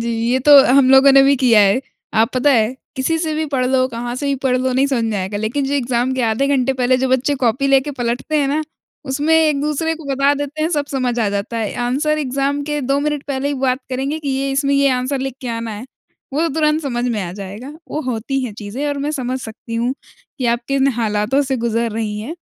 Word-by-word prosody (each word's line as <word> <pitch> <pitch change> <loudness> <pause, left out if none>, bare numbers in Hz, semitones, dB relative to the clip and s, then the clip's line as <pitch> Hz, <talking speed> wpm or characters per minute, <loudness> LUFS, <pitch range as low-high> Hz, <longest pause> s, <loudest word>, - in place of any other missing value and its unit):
जी, 235 0 -2 0.2
ये 260 - +2
तो 290 -1 +10
हम 260 0 +4
लोगों 270 +1 +7
ने 275 0 +7
भी 280 +1 +4
किया 235 -4 +4
है। 200 +5 +3 0.4
आप 225 - +1
पता 270 +3 +3
है? 225 +1 +2 0.2
किसी 295 +5 0
से 315 -2 -2
भी 315 - -1
पढ़ 255 -1 +1
लो, 255 0 +2
कहाँ 240 0 -5
से 285 - -3
भी 280 - +1
पढ़ 255 -1 +2
लो 255 0 0
नहीं 265 +2 +2
समझ 250 -5 0
में 220 -2 -1
आएगा। 190 +2 -3
लेकिन 235 +6 -1
जो 285 - -1
एग्ज़ाम 250 -1 0
के 255 - -1
आधे 230 +5 +1
घंटे 260 +1 +1
पहले 250 +1 +3
जो 260 0 0
बच्चे 260 +3 +1
कॉपी 245 +4 +1
लेके 275 +1 +3
पलटते 245 +6 -1
हैं 275 -1 +1
ना, 305 +2 0 0.4
उसमें 290 +4 +1
एक 305 -3 +3
दूसरे 305 +2 -1
को 320 -2 -12
बता 275 +1 +3
देते 290 +2 -4
हैं 320 - +1
सब 285 -1 -1
समझ 250 -3 -1
आ 210 - +1
जाता 200 +3 -3
है। 220 -2 -2
आंसर 305 +4 0
एग्ज़ाम 275 +1 -1
के 295 0 -1
2 275 +2 0
मिनट 295 -1 -2
पहले 270 +2 -2
ही 290 - -1
बात 255 0 +1
करेंगे 270 +4 -2
कि 290 -3 -5
ये 270 +1 -1
इसमें 275 +1 +1
ये 280 0 +3
आंसर 255 +2 -1
लिख 255 - -10
के 250 - -5
आना 230 -1 -5
है। 210 +3 -7 0.5
वो 295 - 0
तो 335 - +1
तुरंत 310 0 +1
समझ 245 -3 -2
में 215 -4 -1
आ 175 -1 -5
जाएगा। 205 +8 -8 0.2
वो 305 - -2
होती 255 +2 -2
हैं 230 - -5
चीज़ें 225 +8 -4
और 285 -1 -2
मैं 290 +2 -2
समझ 260 -2 -3
सकती 230 0 -8
हूँ 240 +3 0 0.4
कि 250 - -1
आप 240 - -2
किन 275 0 +2
हालातों 225 +4 0
से 265 - +1
गुज़र 230 0 -1
रही 215 -2 -3
हैं। 300 +10 -6
265 Hz, 250 wpm, -18 LUFS, 235-280 Hz, 0.5 s, तो